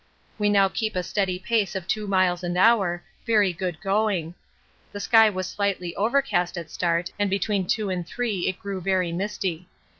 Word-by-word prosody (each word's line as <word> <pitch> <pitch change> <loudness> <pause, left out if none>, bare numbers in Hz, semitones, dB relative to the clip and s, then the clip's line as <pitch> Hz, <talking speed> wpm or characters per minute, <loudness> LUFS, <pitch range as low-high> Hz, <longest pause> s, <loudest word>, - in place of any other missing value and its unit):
We 205 0 +2
now 200 -1 +5
keep 215 +2 -3
a 180 - 0
steady 185 0 -1
pace 205 +1 0
of 190 -2 -4
2 215 -1 -1
miles 185 -2 +2
an 175 0 -2
hour, 190 -4 +3 0.2
very 210 -5 +3
good 175 -2 -4
going. 195 -4 0 0.6
The 205 - -6
sky 225 +1 +5
was 185 -2 -3
slightly 190 -4 -2
overcast 215 -6 +1
at 165 -3 -7
start 170 0 0
and 205 -1 +1
between 195 -1 0
two 210 -1 0
and 180 -1 -2
three 215 -4 -2
it 190 - -1
grew 200 -3 -5
very 185 -1 0
misty. 180 -2 -3
190 Hz, 180 wpm, -25 LUFS, 180-210 Hz, 0.6 s, now